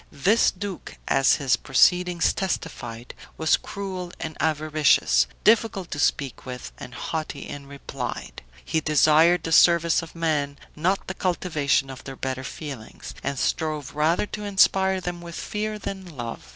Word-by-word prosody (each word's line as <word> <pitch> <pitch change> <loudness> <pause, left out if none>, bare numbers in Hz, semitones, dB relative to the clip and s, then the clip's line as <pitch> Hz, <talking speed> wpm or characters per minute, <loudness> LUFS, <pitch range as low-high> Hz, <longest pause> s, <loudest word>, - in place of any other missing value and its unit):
This 200 +11 +3
duke, 200 -1 -7
as 135 - +4
his 135 -4 +2
proceedings 175 +5 +3
testified, 125 -10 -4 0.2
was 160 0 +3
cruel 185 -3 -6
and 155 -1 -5
avaricious, 150 - +3 0.2
difficult 215 -4 +2
to 145 - -4
speak 140 -2 0
with, 125 -1 -7
and 125 0 -9
haughty 155 0 -4
in 140 -1 -8
reply. 140 -2 -6 0.3
He 160 -1 0
desired 155 +3 +4
the 165 - -4
service 170 0 +5
of 165 0 -11
men, 150 -4 -1 0.2
not 180 +6 0
the 185 - -4
cultivation 155 -7 0
of 130 - -10
their 135 - -8
better 130 0 -4
feelings, 135 -5 -8
and 140 0 -2
strove 155 0 -1
rather 155 +6 +2
to 210 +1 -7
inspire 190 -1 +3
them 175 -1 -5
with 170 -1 -8
fear 215 0 -3
than 190 -6 -7
love. 120 -1 -6
160 Hz, 150 wpm, -24 LUFS, 140-180 Hz, 0.3 s, service